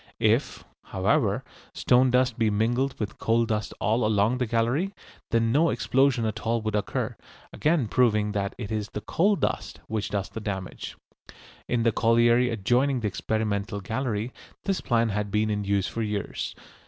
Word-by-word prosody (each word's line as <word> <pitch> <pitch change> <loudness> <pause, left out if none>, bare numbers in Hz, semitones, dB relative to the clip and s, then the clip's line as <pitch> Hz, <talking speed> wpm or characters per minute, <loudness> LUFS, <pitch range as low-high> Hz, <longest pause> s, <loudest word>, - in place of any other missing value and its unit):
If, - - +1 0.2
however, - - +1 0.3
stone 125 +1 +4
dust 125 -1 +2
be 110 -1 +3
mingled 120 +6 0
with 105 -1 -4
coal 115 +1 +2
dust 110 -2 -2
all 115 +3 +1
along 110 +3 +2
the 125 - 0
gallery, 120 - 0 0.3
then 115 0 +2
no 160 +6 +4
explosion 135 -3 +2
at 110 0 -2
all 115 +1 0
would 110 -1 -2
occur, 105 -1 -2 0.4
again 155 -6 +1
proving 105 -3 +2
that 100 -2 -2
it 110 -3 -6
is 110 -1 -2
the 105 - -5
coal 200 - +2
dust - - -2
which 110 -1 -2
does 100 -2 -2
the - - -6
damage. 95 -4 -5 0.7
In 120 -1 +1
the 115 - +3
colliery 120 +2 +4
adjoining 125 +5 +1
the 110 - 0
experimental 100 +1 -2
gallery 115 +2 -3 0.3
this 195 -3 -1
plan 115 -1 +1
had 105 0 -2
been 105 +1 +1
in 105 -1 -2
use 100 -1 +1
for 115 - -4
years. 105 -2 -3
115 Hz, 165 wpm, -26 LUFS, 105-125 Hz, 0.7 s, stone